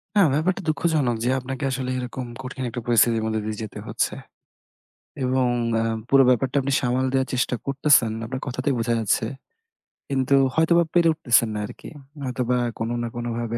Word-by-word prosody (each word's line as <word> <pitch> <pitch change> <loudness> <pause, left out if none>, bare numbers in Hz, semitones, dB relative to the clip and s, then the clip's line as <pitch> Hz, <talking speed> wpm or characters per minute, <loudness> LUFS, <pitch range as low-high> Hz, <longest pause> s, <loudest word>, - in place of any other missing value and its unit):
হ্যাঁ, 200 -5 +6
ব্যাপারটা 180 +7 0
দুঃখজনক 150 -5 +1
যে 125 - +1
আপনাকে 130 +2 -6
আসলে 130 0 -3
এরকম 125 +1 -5 0.2
কঠিন 130 +1 -6
একটা 120 +1 -5
পরিস্থিতির 115 -1 +3
মধ্য 110 0 -1
দিয়ে 110 -1 -4
যেতে 110 - -7
হচ্ছে। - - -1 1.1
এবং 130 0 +2 0.3
এ্যা 115 - +1 0.2
পুরো 135 0 +6
ব্যাপারটা 130 +2 +2
আপনি 135 +1 -2
সামাল 125 0 0
দেয়ার 130 0 +1
চেষ্টা 125 0 0
করতেছেন, 140 -5 +3
আপনার 130 +3 -5
কথাতেই 130 +2 -1
বোঝা 115 +1 0
যাচ্ছে। 110 0 +1 0.8
কিন্তু 135 0 +2 0.2
হয়তোবা 170 +2 +4
পেরে 170 -1 +4
উঠতেছেন 120 -7 +3
না 105 - -2
আর - - -8
কি। - - -9 0.3
হয়তোবা 125 -1 -1 0.2
কোন 115 - -2
না 120 - -2
কোনভাবে 120 -1 -3
130 Hz, 170 wpm, -23 LUFS, 120-140 Hz, 1.1 s, হ্যাঁ